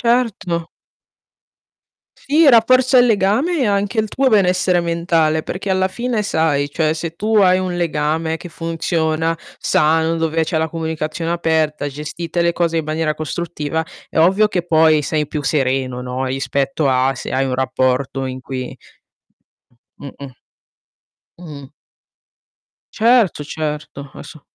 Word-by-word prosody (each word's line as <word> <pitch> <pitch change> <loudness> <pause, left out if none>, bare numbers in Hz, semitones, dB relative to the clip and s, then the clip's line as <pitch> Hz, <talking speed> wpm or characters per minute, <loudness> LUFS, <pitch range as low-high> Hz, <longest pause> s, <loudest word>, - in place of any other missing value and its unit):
Certo. 235 -7 0 1.7
Sì, 305 +3 +3
rafforza 255 +2 +5
il 245 - +6
legame 230 - +1
e - - +2
anche 200 +2 0
il 220 - 0
tuo 270 +3 +1
benessere 185 -4 +3
mentale, 165 -2 +1
perché 195 +5 -5
alla 190 0 +2
fine 235 +2 -2
sai, 155 -7 0
cioè 155 +1 0
se 165 0 -5
tu 220 +4 -1
hai 185 -2 +5
un 185 -1 -3
legame 160 -1 -1
che 175 - -10
funziona, 165 0 -1 0.2
sano, 160 +2 +2
dove 160 0 0
c'è 160 - -2
la 160 0 0
comunicazione 160 +1 -3
aperta, 160 -3 0
gestite 155 +4 -4
le 170 0 +2
cose 170 -1 0
in 160 - -1
maniera 155 0 -1
costruttiva, 160 0 -3 0.3
è - - -6
ovvio 190 +6 +4
che 180 -4 -2
poi 160 -2 +4
sei 150 0 -1
più 150 - -4
sereno, 130 -3 -1
no, 125 +1 -3
rispetto 135 +3 -1
a 130 +1 +2
se - - -6
hai 135 +1 +1
un 130 -1 -1
rapporto 130 +1 -1
in 130 0 -6
cui 130 0 -6 1.2
Mh-mh. 140 -1 -10 1.1
Mh-mh. 145 -6 -10 1.2
Certo, 225 -9 +3
certo, 150 0 -4 0.3
asso 155 - -11
160 Hz, 135 wpm, -18 LUFS, 150-185 Hz, 1.7 s, il